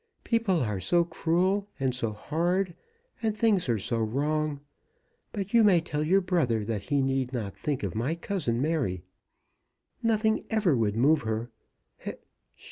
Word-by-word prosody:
People 225 -7 +1
are 105 -4 -2
so 170 - +3
cruel 185 +4 0
and 130 -2 +1
so 115 -3 -2
hard, 175 - -1 0.5
and 220 -2 -1
things 205 - +2
are 115 - +2
so 115 +3 -2
wrong. 145 +6 0 0.7
But 200 -2 -5
you 230 -1 +6
may 195 -5 +6
tell 150 -2 -2
your 190 +5 +3
brother 150 - +1
that 105 -2 -2
he 140 +7 0
need 135 -1 -1
not 105 -6 -3
think 140 -2 -3
of - - -2
my 120 +9 -1
cousin, 170 -10 -2
Mary. 135 - -1 1.0
Nothing 220 -1 +2
ever 210 - +2
would 110 -3 +1
move 145 +5 +4
her. 110 +1 -3
150 Hz, 150 wpm, -28 LUFS, 115-185 Hz, 1.0 s, you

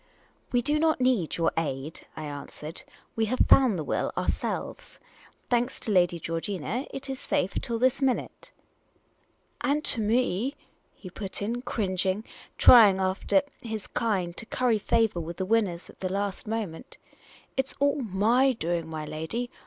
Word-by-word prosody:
" - - -38
We 245 -1 +2
do 300 +3 +2
not 315 -2 +2
need 250 -10 +1
your 165 - +2
aid," 150 -1 -3
I 155 - -5
answered. 150 +2 -7 0.3
"We 225 - +1
have 255 +4 -1
found 250 -8 +6
the 155 - -2
will, - - -1
ourselves. - - -3 0.5
Thanks 245 +1 0
to 220 - -2
Lady 175 -3 +3
Georgina, 175 - -3
it 270 +1 -6
is 265 -1 -4
safe 185 - -1
till 235 -2 -2
this 255 +3 +2
minute." 265 -2 -1 0.6
" - - -41
And 295 +2 +1
to 225 - +4
me," 235 +3 +1 0.4
he 185 - -11
put 190 +1 -5
in, 235 +4 -2
cringing, 190 -4 -1
and - - -24 0.3
trying 215 -6 +8
after 190 +9 +2 0.2
his 220 -3 -5
kind 190 -7 -1
to 220 - -8
curry 240 -4 +1
favour 225 -3 +1
with 170 +1 -6
the 190 - -2
winners 195 -5 0
at - - -16
the 185 -1 -3
last 200 +1 -2
moment. 215 -7 -5 0.3
" - - -25
It 265 0 0
's - - -4
all 285 0 +2
my 230 +5 +3
doing, 170 -6 -2
my 155 -1 -5
lady! 190 +12 -4
215 Hz, 170 wpm, -27 LUFS, 175-245 Hz, 0.6 s, trying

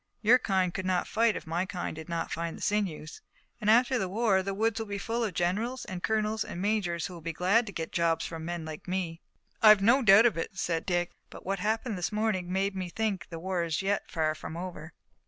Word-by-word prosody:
Your 240 +4 +6
kind 185 -5 +1
could 190 0 -3
not 185 -1 +1
fight 225 -1 +2
if - - -6
my 165 +3 -1
kind 185 -4 -4
did 160 +2 -9
not 170 -1 -3
find 165 0 -3
the - - -12
sinews, 190 -7 -2 0.4
and 210 - +1
after 245 +3 +4
the 190 - -2
war 205 -1 +2
the 195 +1 -3
woods 225 +2 +1
will 225 - -4
be 200 0 -3
full 230 +4 -2
of 205 -6 -3
generals, 220 +9 -1
and 185 -2 -6
colonels 220 +1 0
and 175 - -7
majors 190 -5 0
who 185 - -6
will 170 - -9
be 165 +1 -4
glad 200 +8 +2
to - - -5
get 165 -3 -5
jobs 165 -1 +1
from 165 -1 -6
men 170 -1 -4
like 155 +2 -8
me." 180 -3 -3 0.4
"I've 215 -2 +8
no 240 +6 +5
doubt 210 0 +7
of 230 -7 +3
it," 190 - -5
said 165 -3 -1
Dick, 175 -1 0 0.2
"but - - -12
what 195 +1 -1
happened 220 +1 -1
this 175 - -1
morning 210 -4 -1
made 195 +1 0
me 185 -2 -3
think 200 -2 -2
the 165 - -6
war 180 +1 -2
is 165 +1 -2
yet 200 +1 -1
far 155 -2 0
from 155 +1 -7
over." 170 -3 -7
190 Hz, 240 wpm, -29 LUFS, 170-215 Hz, 0.4 s, I've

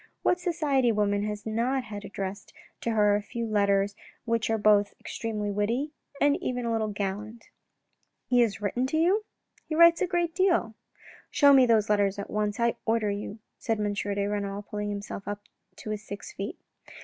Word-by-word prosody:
What 360 - +3
society 300 -8 +1
woman 205 -1 +1
has 210 -1 -5
not 240 +4 0
had 205 -3 -7
addressed 200 0 -6 0.2
to - - -2
her 210 -2 +4
a 205 - 0
few 230 +3 -4
letters 200 -2 +2 0.3
which 230 -1 0
were 225 - +2
both 205 -1 +3
extremely 210 -2 -3
witty 230 +9 -1 0.3
and 285 0 +3
even 250 -1 -2
a 230 - 0
little 220 -1 0
gallant? 210 +2 -5 0.2
" - - -50
" - - -47
He 245 - +5
has 210 -4 +2
written 245 +6 0
to 315 - -1
you? 370 +7 +3
" - - -54
" - - -32
He 310 - -1
writes 335 0 +7
a 375 - +2
great 345 -2 0
deal." 350 - +2 0.3
" - - -20
Show 285 -2 +6
me 260 -2 +7
those 220 -2 +3
letters 205 -1 +2
at 200 - -6
once, 210 +1 -1
I 235 0 +1
order 225 -2 +1
you," 205 +1 -5 0.3
and 225 -1 +2
M. 205 -1 0
de 200 0 -1
Renal 205 0 -3
pulled 210 0 -4
himself 200 -1 -6
up 205 0 -4 0.3
to 215 - -7
his 210 -1 -3
six 210 - -8
feet. - - -5
215 Hz, 200 wpm, -28 LUFS, 205-250 Hz, 0.3 s, writes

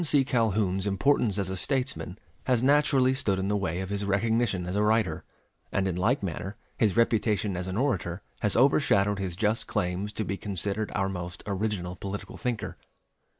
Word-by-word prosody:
Calhoun's 105 -6 +1
importance 105 0 +2
as 95 -2 -1
a - - -2
statesman 125 -4 -1 0.3
has 125 -2 +2
naturally 140 -2 +4
stood 100 -7 0
in 95 +1 -1
the 105 - +1
way 95 -3 -1
of 95 +1 -5
his 100 0 -1
recognition 100 -1 +1
as 90 +2 -3
a 105 - +2
writer, 105 -6 +1 0.5
and 95 0 +1
in 90 - -1
like 105 +7 +1
manner 95 +2 -4 0.2
his 110 -1 +1
reputation 110 -4 +2
as 90 +1 -3
an 95 +2 -3
orator 100 -9 -1 0.2
has 105 - 0
overshadowed 105 -7 +3
his 95 -3 -2
just 105 +3 +1
claims 90 +4 -1
to 110 0 -3
be 100 - -3
considered 100 +2 -2
our 95 -2 +1
most 90 -2 -5
original 100 -3 -2
political 100 +2 -6
thinker. 120 -4 -3
100 Hz, 175 wpm, -28 LUFS, 95-115 Hz, 0.5 s, naturally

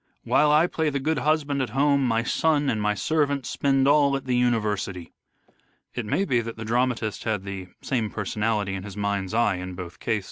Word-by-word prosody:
While 150 0 +3
I 155 +3 +5
play 160 -3 -1
the 140 -1 -2
good 150 +2 0
husband 145 -1 +1
at 130 - -2
home 140 0 +3
my 115 -1 +1
son 145 +1 +1
and 110 - -2
my 105 0 +1
servant 145 +3 0
spend 135 -1 +1
all 145 -1 +4
at 135 - -9
the 125 -1 0
university." 105 -7 -1 0.8
It 120 -4 -4
may 195 - +1
be 125 -9 +1
that 115 -1 -7
the 115 - -6
dramatist 120 -2 0
had 105 -4 -1
the 95 -2 -6 0.2
same 115 -5 -1
personality 105 -1 -1
in 95 - -4
his 100 0 -9
mind's 100 0 -2
eye 115 -5 +2
in 90 0 -6
both 90 -1 -8
cases. 110 -2 0
120 Hz, 205 wpm, -25 LUFS, 105-140 Hz, 0.8 s, I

